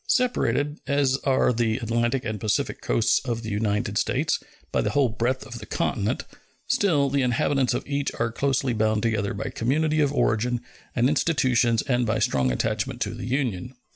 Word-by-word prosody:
Separated, 150 Hz, -, +1 dB
as 140 Hz, -2 st, +2 dB
are 130 Hz, -2 st, +3 dB
the 115 Hz, -1 st, +1 dB
Atlantic 120 Hz, +2 st, 0 dB
and 110 Hz, -1 st, -3 dB
Pacific 105 Hz, +1 st, -1 dB
coasts 115 Hz, +1 st, +2 dB
of 120 Hz, -3 st, -4 dB
the 110 Hz, -, -4 dB
United 105 Hz, 0 st, 0 dB
States, -, -, 0 dB, 0.3 s
by -, -, +1 dB
the -, -, 0 dB
whole 140 Hz, -3 st, +2 dB
breadth 120 Hz, +4 st, -1 dB
of 120 Hz, -3 st, -8 dB
the -, -, -10 dB
continent, -, -, -1 dB, 0.4 s
still 155 Hz, -9 st, +2 dB
the 140 Hz, 0 st, +1 dB
inhabitants 125 Hz, +1 st, +1 dB
of -, -, -3 dB
each 140 Hz, 0 st, -1 dB
are 115 Hz, 0 st, 0 dB
closely 135 Hz, 0 st, 0 dB
bound 110 Hz, -1 st, +1 dB
together 110 Hz, -3 st, 0 dB
by 100 Hz, -, -4 dB
community 155 Hz, +6 st, +1 dB
of 145 Hz, -2 st, +3 dB
origin 120 Hz, -2 st, +1 dB, 0.3 s
and 120 Hz, 0 st, +3 dB
institutions 130 Hz, -6 st, +2 dB
and 125 Hz, -2 st, +1 dB
by 110 Hz, +1 st, +1 dB
strong 65 Hz, -, +1 dB
attachment -, -, -1 dB
to -, -, -1 dB
the -, -, -6 dB
Union. 125 Hz, -3 st, -2 dB
120 Hz, 175 wpm, -25 LUFS, 110-140 Hz, 0.4 s, are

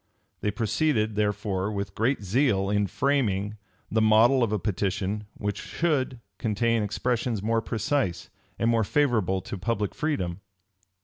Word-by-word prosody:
They 105 Hz, -, 0 dB
proceeded, 110 Hz, +1 st, +1 dB
therefore, 105 Hz, -1 st, 0 dB
with 100 Hz, -1 st, -4 dB
great 115 Hz, +1 st, 0 dB
zeal, 100 Hz, -2 st, +2 dB
in 105 Hz, -1 st, +2 dB
framing, 110 Hz, -, 0 dB, 0.3 s
the 110 Hz, -, +2 dB
model 110 Hz, +4 st, +5 dB
of 115 Hz, -3 st, +2 dB
a 105 Hz, -, +1 dB
petition 100 Hz, +1 st, -2 dB
which 105 Hz, -1 st, -3 dB
should 135 Hz, -7 st, -1 dB, 0.2 s
contain 115 Hz, 0 st, +1 dB
expressions 115 Hz, +1 st, -1 dB
more 115 Hz, +1 st, +1 dB
precise, 115 Hz, -, -1 dB, 0.3 s
and 115 Hz, -, +1 dB
more 115 Hz, -1 st, +3 dB
favorable 110 Hz, -8 st, +1 dB
to 95 Hz, -, -6 dB
public 105 Hz, 0 st, -1 dB
freedom. 100 Hz, -, -2 dB
110 Hz, 135 wpm, -26 LUFS, 100-120 Hz, 0.3 s, model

